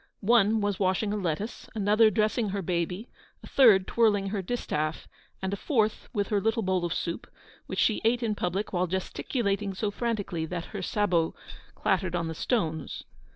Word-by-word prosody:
One 220 Hz, -1 st, +4 dB
was 205 Hz, -2 st, -1 dB
washing 195 Hz, +2 st, +1 dB
a -, -, 0 dB
lettuce, 200 Hz, +3 st, -3 dB
another 215 Hz, +1 st, +4 dB
dressing 215 Hz, +2 st, +1 dB
her 195 Hz, 0 st, -3 dB
baby, 180 Hz, +5 st, -2 dB, 0.4 s
a -, -, -9 dB
third 215 Hz, -8 st, +6 dB
twirling 205 Hz, -4 st, +2 dB
her 200 Hz, -1 st, -2 dB
distaff, 160 Hz, -7 st, -2 dB, 0.4 s
and 190 Hz, +1 st, -1 dB
a -, -, +1 dB
fourth 220 Hz, -2 st, 0 dB
with 205 Hz, -3 st, -1 dB
her 205 Hz, -2 st, +1 dB
little 225 Hz, +2 st, +1 dB
bowl 185 Hz, -1 st, +1 dB
of 170 Hz, -, -3 dB
soup, 170 Hz, +1 st, -3 dB, 0.4 s
which -, -, -5 dB
she 220 Hz, -, +2 dB
ate 235 Hz, +2 st, +2 dB
in 220 Hz, -2 st, +1 dB
public 195 Hz, +1 st, -2 dB
while 180 Hz, 0 st, +1 dB
gesticulating 195 Hz, +2 st, -2 dB
so 205 Hz, +1 st, -1 dB
frantically 200 Hz, -8 st, -2 dB
that 175 Hz, 0 st, -4 dB
her 200 Hz, -, -3 dB
sabots 180 Hz, -4 st, +1 dB, 0.4 s
clattered 185 Hz, -2 st, 0 dB
on 170 Hz, -1 st, -1 dB
the 160 Hz, -, -3 dB
stones. 160 Hz, -, -2 dB
200 Hz, 175 wpm, -28 LUFS, 180-220 Hz, 0.4 s, third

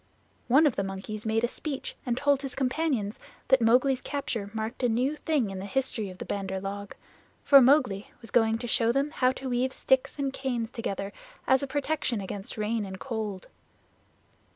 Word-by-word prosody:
One 275 Hz, +6 st, +6 dB
of 285 Hz, -, +2 dB
the 195 Hz, -, +1 dB
monkeys 195 Hz, +3 st, -5 dB
made 220 Hz, +1 st, +1 dB
a -, -, +4 dB
speech 275 Hz, +2 st, -5 dB
and 240 Hz, 0 st, 0 dB
told 285 Hz, 0 st, +2 dB
his 270 Hz, -3 st, -5 dB
companions 260 Hz, -6 st, -1 dB, 0.3 s
that 265 Hz, -2 st, +5 dB
Mowgli's 250 Hz, +3 st, +4 dB
capture 235 Hz, -7 st, -3 dB
marked 220 Hz, +3 st, -4 dB
a 245 Hz, -, +3 dB
new 255 Hz, +6 st, +1 dB
thing 295 Hz, -10 st, 0 dB
in 190 Hz, -, -5 dB
the 190 Hz, -, -5 dB
history 255 Hz, -5 st, -1 dB
of 185 Hz, -, -10 dB
the -, -, -6 dB
Bandar 190 Hz, -1 st, -3 dB
log, 200 Hz, +1 st, -6 dB, 0.5 s
for 275 Hz, -2 st, +8 dB
Mowgli 250 Hz, -7 st, +3 dB
was 230 Hz, -, -11 dB
going 225 Hz, -1 st, +3 dB
to 240 Hz, +1 st, -5 dB
show 230 Hz, 0 st, +2 dB
them 275 Hz, +4 st, 0 dB
how 255 Hz, -4 st, +2 dB
to 265 Hz, -, -6 dB
weave 250 Hz, +1 st, +1 dB
sticks 265 Hz, +2 st, +1 dB
and 275 Hz, -2 st, -1 dB
canes 245 Hz, -4 st, -2 dB
together 200 Hz, -5 st, -4 dB, 0.3 s
as 265 Hz, 0 st, +4 dB
a 280 Hz, -, -2 dB
protection 285 Hz, -4 st, -1 dB
against 195 Hz, +2 st, -6 dB
rain 215 Hz, +1 st, 0 dB
and 190 Hz, -1 st, -7 dB
cold. 215 Hz, -6 st, -4 dB
240 Hz, 190 wpm, -28 LUFS, 210-270 Hz, 0.5 s, for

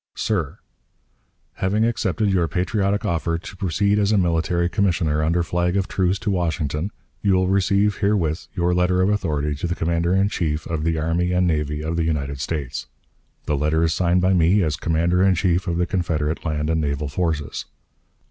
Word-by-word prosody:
_ -, -, -12 dB
"SIR: 90 Hz, -10 st, -1 dB, 1.0 s
Having 105 Hz, +4 st, +1 dB
accepted 110 Hz, -2 st, 0 dB
your 90 Hz, -3 st, +2 dB
patriotic 100 Hz, +4 st, 0 dB
offer 85 Hz, -3 st, 0 dB
to 85 Hz, -, -10 dB
proceed 100 Hz, +3 st, +1 dB
as 100 Hz, 0 st, +2 dB
a 105 Hz, -, +3 dB
military 85 Hz, -1 st, +1 dB
commissioner 85 Hz, -6 st, +1 dB
under 85 Hz, +3 st, +1 dB
flag 90 Hz, +2 st, 0 dB
of 95 Hz, -1 st, 0 dB
truce 95 Hz, 0 st, 0 dB
to 100 Hz, +2 st, -2 dB
Washington, 80 Hz, -1 st, -1 dB, 0.3 s
you 100 Hz, -2 st, +3 dB
will 95 Hz, 0 st, +2 dB
receive 100 Hz, +2 st, +2 dB
herewith 95 Hz, -6 st, 0 dB
your 90 Hz, -1 st, +1 dB
letter 90 Hz, +1 st, +2 dB
of 95 Hz, -, +2 dB
authority 75 Hz, -8 st, 0 dB
to 75 Hz, +4 st, -3 dB
the 85 Hz, -, -2 dB
Commander 85 Hz, +2 st, 0 dB
in 95 Hz, +1 st, +3 dB
Chief 80 Hz, -6 st, -2 dB
of 80 Hz, -2 st, -3 dB
the 80 Hz, -1 st, +1 dB
Army 85 Hz, +3 st, 0 dB
and 90 Hz, 0 st, +2 dB
Navy 75 Hz, -2 st, -1 dB
of 80 Hz, +2 st, -2 dB
the 85 Hz, -, +1 dB
United 70 Hz, -4 st, -2 dB
States. 70 Hz, -4 st, -4 dB, 0.6 s
The 75 Hz, -, 0 dB
letter 75 Hz, +3 st, +1 dB
is 80 Hz, -1 st, +2 dB
signed 90 Hz, 0 st, +2 dB
by 95 Hz, +1 st, +3 dB
me, 90 Hz, +3 st, +4 dB
as 75 Hz, -2 st, 0 dB
Commander 85 Hz, +3 st, +1 dB
in 95 Hz, -1 st, +4 dB
Chief 90 Hz, +1 st, +1 dB
of 85 Hz, -1 st, -1 dB
the 90 Hz, -, +2 dB
Confederate 80 Hz, -4 st, -1 dB
land 75 Hz, 0 st, -1 dB
and 80 Hz, -1 st, +1 dB
naval 70 Hz, 0 st, -2 dB
forces. 75 Hz, -1 st, -2 dB
85 Hz, 190 wpm, -22 LUFS, 80-95 Hz, 1.0 s, me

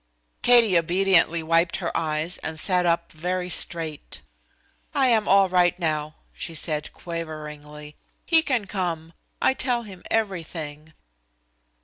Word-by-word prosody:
Katie 235 Hz, -6 st, +5 dB
obediently 170 Hz, -1 st, +2 dB
wiped 165 Hz, +1 st, +2 dB
her 175 Hz, -3 st, -4 dB
eyes 155 Hz, +1 st, -1 dB
and 160 Hz, 0 st, -5 dB
sat 180 Hz, 0 st, +1 dB
up 170 Hz, 0 st, 0 dB
very 180 Hz, +3 st, -3 dB
straight. 160 Hz, -4 st, +1 dB, 0.7 s
"I 265 Hz, -2 st, +3 dB
am 220 Hz, -3 st, +2 dB
all 195 Hz, 0 st, +5 dB
right 180 Hz, -1 st, +2 dB
now," 155 Hz, -3 st, -2 dB, 0.2 s
she 165 Hz, -, -5 dB
said 150 Hz, -1 st, -1 dB
quaveringly. 150 Hz, -3 st, -8 dB, 0.3 s
"He 325 Hz, -1 st, +5 dB
can 250 Hz, -9 st, -1 dB
come. 170 Hz, -4 st, -4 dB, 0.3 s
I -, -, +4 dB
tell 250 Hz, -3 st, -1 dB
him 195 Hz, -4 st, -11 dB
everything." 160 Hz, -7 st, -4 dB
170 Hz, 125 wpm, -24 LUFS, 155-195 Hz, 0.7 s, Katie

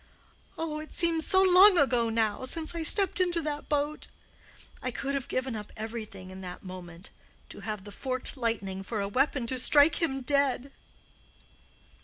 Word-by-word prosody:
Oh, 315 Hz, -2 st, -3 dB
it 310 Hz, -, -9 dB
seems 330 Hz, -2 st, +3 dB
so 380 Hz, 0 st, +5 dB
long 375 Hz, +1 st, +7 dB
ago 245 Hz, -6 st, +3 dB
now 225 Hz, 0 st, -1 dB
since 315 Hz, +5 st, 0 dB
I 335 Hz, -, -4 dB
stepped 385 Hz, +3 st, +3 dB
into 350 Hz, -2 st, +1 dB
that 295 Hz, -1 st, -5 dB
boat! 295 Hz, +1 st, -2 dB, 0.7 s
I 255 Hz, -, -2 dB
could 275 Hz, +3 st, -4 dB
have 275 Hz, -1 st, -3 dB
given 255 Hz, -2 st, -2 dB
up 210 Hz, -1 st, -8 dB
everything 215 Hz, -4 st, -7 dB
in 190 Hz, 0 st, -10 dB
that 180 Hz, -1 st, -9 dB
moment, 180 Hz, -1 st, -10 dB, 0.4 s
to -, -, -10 dB
have 210 Hz, -3 st, -5 dB
the 205 Hz, -, -11 dB
forked 255 Hz, +4 st, -2 dB
lightning 215 Hz, -6 st, -3 dB
for 215 Hz, +3 st, -5 dB
a 200 Hz, -, -1 dB
weapon 260 Hz, +3 st, 0 dB
to 255 Hz, +2 st, -1 dB
strike 290 Hz, +6 st, +4 dB
him 270 Hz, -5 st, -1 dB
dead." 275 Hz, 0 st, +1 dB
260 Hz, 170 wpm, -28 LUFS, 215-305 Hz, 0.7 s, long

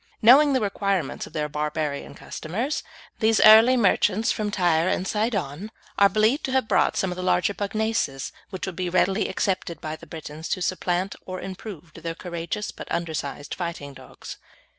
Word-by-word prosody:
Knowing 275 Hz, +6 st, +7 dB
the 260 Hz, -, +3 dB
requirements 200 Hz, -, -1 dB
of -, -, -16 dB
their 150 Hz, -2 st, -1 dB
barbarian 150 Hz, -1 st, -3 dB
customers, 230 Hz, -, -4 dB, 0.4 s
these 220 Hz, -1 st, +3 dB
early 225 Hz, +4 st, +8 dB
merchants 210 Hz, 0 st, +2 dB
from 210 Hz, -1 st, -2 dB
Tyre 175 Hz, -4 st, +2 dB
and 185 Hz, 0 st, 0 dB
Sidon 205 Hz, -, -2 dB, 0.3 s
are 200 Hz, 0 st, +7 dB
believed 220 Hz, -, +2 dB
to 265 Hz, -, -3 dB
have 265 Hz, -4 st, +2 dB
brought -, -, +2 dB
some 190 Hz, -, 0 dB
of -, -, -4 dB
the 185 Hz, -, -5 dB
larger 185 Hz, +2 st, +2 dB
pugnaces, 205 Hz, -9 st, -2 dB, 0.2 s
which 190 Hz, -2 st, -5 dB
would 190 Hz, -, -6 dB
be 180 Hz, +1 st, -2 dB
readily 190 Hz, +3 st, +2 dB
accepted 185 Hz, -5 st, -2 dB
by 155 Hz, -1 st, -5 dB
the 170 Hz, -, -14 dB
Britons 155 Hz, 0 st, -8 dB
to -, -, -1 dB
supplant, 185 Hz, +1 st, -1 dB
or 185 Hz, 0 st, -5 dB
improve, 185 Hz, -4 st, -8 dB
their 165 Hz, 0 st, -6 dB
courageous 170 Hz, +4 st, -4 dB
but -, -, -10 dB
undersized 150 Hz, -4 st, -3 dB
fighting 170 Hz, -5 st, -5 dB
dogs. -, -, -11 dB
185 Hz, 170 wpm, -24 LUFS, 165-215 Hz, 0.4 s, early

